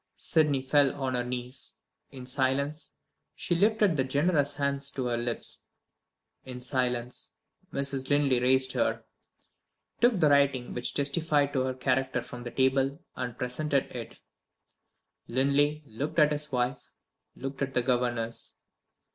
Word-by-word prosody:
Sydney 150 -4 +2
fell 140 0 +3
on 135 -2 -2
her 125 -1 0
knees. 125 +2 -6 0.3
In 130 -2 -9
silence 140 +4 -1 0.4
she - - -1
lifted 210 0 +3
that 130 -1 0
generous 145 0 +2
hand 140 -1 -1
to 130 - -2
her 120 -1 0
lips. 120 0 -3 0.8
In 125 -1 -7
silence, 125 -1 -2 0.4
Mrs. 135 -1 -2
Linley 145 -3 +3
raised 130 +1 +3
her - - 0 1.0
took 240 -5 +4
the 155 -3 +5
writing 140 -3 +3
which 120 - -2
testified 145 0 +1
to 130 - +1
her 130 -1 -2
character 130 -1 0
from 120 - -9
the 120 - -5
table 135 +3 +1 0.2
and 125 -2 -4
presented 135 +2 -1
it. 115 -2 -7 1.1
Linley 140 +4 +2
looked 145 +7 -5
at 150 -2 +5
his 150 0 -2
wife, 125 +1 -1 0.5
looked 135 +1 -6
at 135 -1 -2
the 125 - +2
governess. 120 -2 -1
135 Hz, 140 wpm, -29 LUFS, 125-145 Hz, 1.1 s, the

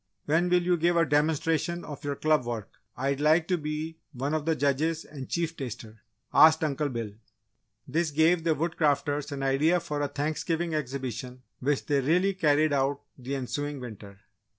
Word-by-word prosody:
"When 165 +4 +2
will 180 0 +3
you 175 0 +2
give 170 +1 +2
a 165 - +4
demonstration 160 +3 +1
of 145 -2 -8
your 145 -1 -2
club 155 -2 +2
work? 115 -4 -4 0.3
I'd 135 +2 -1
like 160 +2 +4
to 180 - +3
be 155 +2 -4
one 135 +3 -2
of 155 0 -2
the 160 - +3
judges 150 +3 0
and 135 -3 -9
chief 165 -1 -1
taster," 110 -5 -7 0.3
asked 160 0 +7
Uncle 150 -1 0
Bill. 115 -4 -4 0.8
This 165 +4 0
gave 160 +3 +3
the 165 -2 +2
Woodcrafters 145 -2 0
an 140 -1 -4
idea 150 +6 +3
for 150 -3 -4
a 145 - +1
Thanksgiving 160 +3 -2
exhibition 130 -3 -4 0.2
which 140 +1 0
they 145 -2 +2
really 180 +8 +2
carried 155 -4 +2
out 140 0 +1
the 130 +2 -5
ensuing 145 +2 -3
winter. 105 -5 -10
150 Hz, 175 wpm, -28 LUFS, 135-160 Hz, 0.8 s, asked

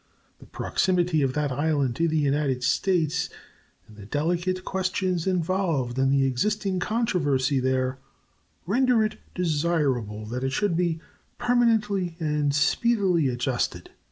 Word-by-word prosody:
The - - -15
proximity 175 -4 0
of 135 -2 +1
that 150 -1 -1
island 140 -2 0
to 170 - +2
the 160 -1 0
United 140 -3 0
States 165 +2 +1 0.6
and 105 - -16
the 100 -2 -11
delicate 175 - -1
questions 185 -2 -1
involved 170 -8 0
in 135 0 +3
the 135 0 +3
existing 195 - 0
controversy 150 - +1
there 130 0 0 0.7
render 240 +4 +3
it 215 - -5 0.2
desirable 145 - 0
that 125 +4 -4
it 135 0 -1
should 205 +2 +1
be 165 -2 0 0.4
permanently 220 -8 +1
and 150 -2 0
speedily 185 - +2
adjusted. 120 0 -2
160 Hz, 130 wpm, -25 LUFS, 135-185 Hz, 0.7 s, in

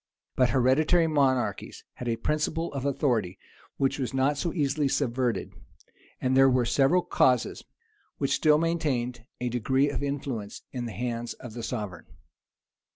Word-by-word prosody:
But 125 -1 +3
hereditary 150 +7 +3
monarchies 140 -5 0
had 125 - -7
a 115 - +1
principle 155 +6 -1
of 140 -1 -4
authority 120 -10 0 0.4
which 135 +1 0
was 130 0 -3
not 135 +2 +2
so 165 +4 -2
easily 145 -2 0
subverted; 125 -3 -1 0.7
and 130 0 +1
there 135 0 +7
were 125 -1 +2
several 145 +9 +3
causes 125 -2 +1 0.5
which 140 - 0
still 150 -1 +4
maintained 135 -8 -1
a 125 - -2
degree 130 +4 +1
of - - -3
influence 135 -7 -4
in 125 -2 -4
the - - -6
hands 120 0 -3
of 120 -3 -10
the 120 - -6
sovereign. 105 -7 -5
130 Hz, 150 wpm, -27 LUFS, 120-145 Hz, 0.7 s, there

